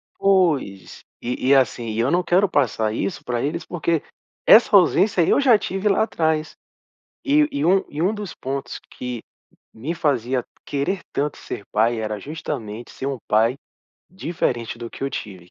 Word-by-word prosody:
Pois. 160 - +1 0.2
E 125 +1 -3
e, 140 - +7
assim, 125 -3 +1
e 110 +1 -3
eu 125 +6 +2
não 180 +1 +2
quero 185 +4 +3
passar 110 - +1
isso 170 - -3
pra 120 -1 -2
eles, 160 +5 -2
porque 170 -2 -1 0.4
essa 220 -2 +7
ausência 190 +1 +4
eu - - +4
já 250 -5 +6
tive 195 +1 -1
lá 195 - +3
atrás. 160 -6 -1 0.7
E 295 +1 +4
e 285 0 -2
um 190 +2 +4
e 150 +2 -4
um 195 +5 +2
dos 205 -4 -6
pontos 135 +1 -5
que 125 -2 -6 0.5
me 140 +10 -4
fazia 130 -5 0 0.2
querer 145 +7 -2
tanto 145 0 -1
ser 100 - -7
pai, 115 +2 +2
era 110 -1 -3
justamente 120 -6 -6
ser 135 - -6
um 140 -2 -2
pai 115 +4 +3 0.5
diferente 130 - -2
do 115 -1 -7
que - - -10
eu 135 - -2
tive. 90 -4 -7
140 Hz, 170 wpm, -22 LUFS, 120-180 Hz, 0.7 s, e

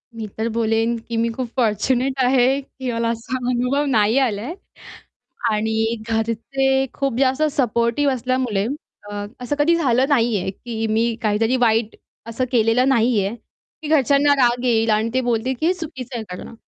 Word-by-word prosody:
मी 220 -1 -5
तर 220 +1 -1
बोलेन, 225 +1 +1
की 230 0 -6
मी 230 +1 +1
खूप 255 0 -3
फॉर्च्युनेट 250 +3 +1
आहे, 255 +1 +3
की 260 -2 -6
मला 230 0 -1
असा 230 +3 -3
अनुभव 250 +4 0
नाही 220 +1 +3
आला 225 -7 0
आहे 275 +10 -5 1.0
आणि 220 +1 0
घरचे 265 +4 0
खूप 275 -4 -2
जास्त 265 +2 +2
सपोर्टिव्ह 245 +2 +1
असल्यामुळे 250 -5 -1 0.4
अ, - - -7 0.3
असं 250 +4 -2
कधी 325 +4 +4
झालं 260 -6 +2
नाही 235 -6 +2
आहे, 190 - -2
की 225 +2 -5
मी 225 +1 +1
काहीतरी 225 +3 +1
वाईट 225 -2 +1 0.3
असं 240 +3 -2
केलेलं 240 +2 +3
नाही 235 -3 +3
आहे, 205 +4 -3
की 300 +6 -15
घरच्यांना 285 -1 +4
राग 245 -2 +2
येईल 225 -2 +2
आणि 215 +1 +2
ते 260 - +2
बोलतील, 240 +1 0
की - - 0
हे 355 - +3
चुकीचं 275 -8 -7
आहे 225 - -4
करणं. 180 - -10
240 Hz, 170 wpm, -21 LUFS, 225-265 Hz, 1.0 s, कधी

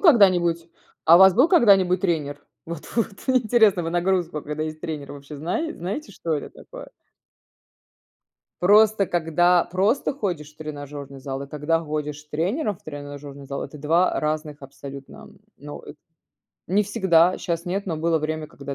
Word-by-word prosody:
когда-нибудь 180 - +4 0.4
а 165 +1 +8
у - - +6
вас 190 -1 +8
был 255 +7 +5
когда-нибудь 195 - +4
тренер? 155 -6 -1 0.2
Вот-вот, 170 +7 -3 0.2
мне 260 -1 +5
интересно, 220 -5 +3
вы 165 - -3
нагрузку, 175 -3 0
когда 150 +1 -4
есть 155 0 -6
тренер 150 -3 -6
вообще 145 +1 -10
знае 180 - -3
знаете, 200 - -5
что 165 -3 -3
это 145 - -5
такое? - - -11 1.7
Просто, 210 +1 +5
когда 175 +1 +2
просто 200 +11 0
ходишь 175 - -4
в - - -40
тренажерный 145 -2 -8
зал 135 0 -5
и - - -7
когда 150 +3 -1
ходишь 150 -2 -4
с 150 - -22
тренером 190 - -1
в - - -29
тренажерный 145 -1 -9
зал- 140 0 -4
это - - -10
2 165 +5 +2
разных 150 -1 -3
абсолютно. 135 0 -11 0.3
Но 145 +1 -9
эт 150 - -12 0.7
не 200 +4 +2
всегда. 185 -4 +3
Щас 170 -1 -3
нет, 195 +3 -2
но 165 - -2
было 165 +1 +1
время 155 0 -3
когда, 140 -3 -8
165 Hz, 160 wpm, -23 LUFS, 150-190 Hz, 1.7 s, а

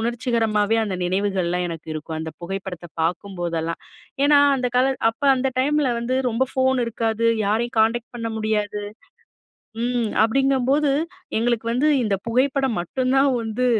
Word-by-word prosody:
உணர்ச்சிகரமாவே 225 -2 +1
அந்த 190 -3 -3
நினைவுகள்லாம் 180 -1 0
எனக்கு 165 -1 -8
இருக்கும். 155 +1 -5
அந்த 160 0 -5
புகைப்படத்த 180 -1 -6
பார்க்கும்போதெல்லாம் 170 -1 -2 0.4
ஏன்னா, 290 0 +6 0.2
அந்த 250 -1 -1
கால 265 +2 +3 0.2
அப்ப 225 - -24
அந்த 265 +1 0
டைம்ல 290 -1 +2
வந்து 250 +2 -1
ரொம்ப 255 +4 +1
ஃபோன் 260 -1 +2
இருக்காது. 230 0 -1 0.2
யாரையும் 225 +2 0
கான்டெக்ட் 235 +2 0
பண்ண 230 -1 -3
முடியாது. 210 -1 -1 1.0
ம் 240 -2 0
அப்பிடிங்கும்போது 270 +4 +2 0.5
எங்களுக்கு 230 0 0
வந்து, 255 +6 +2
இந்த 210 -3 0
புகைப்படம் 265 +1 +1
மட்டும்தான் 260 +8 +1
வந்து 225 +3 -1
230 Hz, 130 wpm, -22 LUFS, 200-255 Hz, 1.0 s, ஏன்னா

